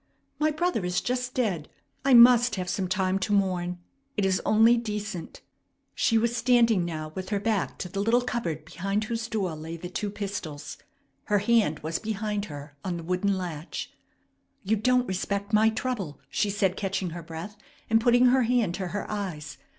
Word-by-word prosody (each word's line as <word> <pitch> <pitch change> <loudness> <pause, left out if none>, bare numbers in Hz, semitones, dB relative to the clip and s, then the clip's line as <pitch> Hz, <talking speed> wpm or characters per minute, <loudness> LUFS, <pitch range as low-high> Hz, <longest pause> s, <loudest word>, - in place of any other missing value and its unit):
My 310 0 +3
brother 310 - 0
is 180 0 0
just 250 0 -2
dead. 190 -12 -1 0.3
I 270 -2 +5
must 240 0 +7
have 185 -2 -3
some 185 +1 -1
time 185 +1 0
to 195 - -2
mourn. 180 -3 +1 0.4
It 205 - +2
is 190 -1 +1
only 225 +2 +6
decent." 210 -6 -5 0.5
She 225 - +2
was 235 +1 +1
standing 230 -4 +4
now 155 -2 -4
with 185 +1 -6
her 205 - 0
back 210 -2 -1
to - - -4
the 195 +2 -5
little 230 +4 +3
cupboard 170 -12 -3
behind 195 +6 -2
whose 225 0 -3
door 200 -7 -2
lay 160 +2 -7
the 175 +2 -7
two 210 - -2
pistols. 195 -8 -6 0.5
Her 210 - +2
hand 205 -7 +2
was 160 +2 -2
behind 210 -1 -2
her 145 -3 -9
on 180 -2 -2
the 165 - -7
wooden 185 +3 0
latch. 170 -3 -5 0.7
"You 210 +3 +2
don't 250 +3 +2
respect 200 +2 -2
my 215 +1 +5
trouble!" 220 - -3
she 210 - +1
said, 195 -2 +1
catching 190 -3 -2
her 170 +1 -6
breath, 165 +5 -8 0.3
and 225 0 +3
putting 245 +1 +5
her 260 +1 +4
hand 235 -6 +2
to 185 0 -3
her 200 +4 -4
eyes. 175 -8 -5
200 Hz, 180 wpm, -27 LUFS, 180-225 Hz, 0.7 s, must